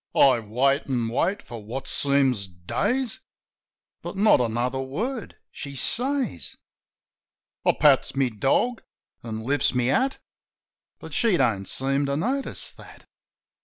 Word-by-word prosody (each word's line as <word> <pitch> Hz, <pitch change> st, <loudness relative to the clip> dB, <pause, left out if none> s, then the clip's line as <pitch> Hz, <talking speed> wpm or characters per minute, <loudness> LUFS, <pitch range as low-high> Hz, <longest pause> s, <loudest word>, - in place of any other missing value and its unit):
I 130 Hz, -3 st, +6 dB
wait, 130 Hz, +6 st, +1 dB
an' 120 Hz, -3 st, 0 dB
wait 175 Hz, -, 0 dB
for 115 Hz, -3 st, -9 dB
what 130 Hz, +6 st, -6 dB
seems 135 Hz, -7 st, +1 dB
days; 220 Hz, -, -2 dB, 0.8 s
But -, -, -6 dB
not 205 Hz, -8 st, +5 dB
another 120 Hz, +3 st, -1 dB
word 215 Hz, -, -4 dB, 0.2 s
she 140 Hz, -1 st, -8 dB
says. 245 Hz, -, -1 dB, 1.1 s
I -, -, +4 dB
pats 145 Hz, -3 st, +4 dB
my 135 Hz, -2 st, +2 dB
dog, 135 Hz, -, +1 dB, 0.4 s
an' 110 Hz, -1 st, -6 dB
Hfts 140 Hz, 0 st, +1 dB
my 125 Hz, -, +2 dB
hat; 255 Hz, -, +1 dB, 0.8 s
But -, -, -11 dB
she 225 Hz, -7 st, +2 dB
don't 110 Hz, -8 st, +1 dB
seem 135 Hz, +1 st, 0 dB
to 140 Hz, 0 st, 0 dB
notice 260 Hz, -, -1 dB
that. -, -, -15 dB
135 Hz, 130 wpm, -25 LUFS, 120-195 Hz, 1.1 s, I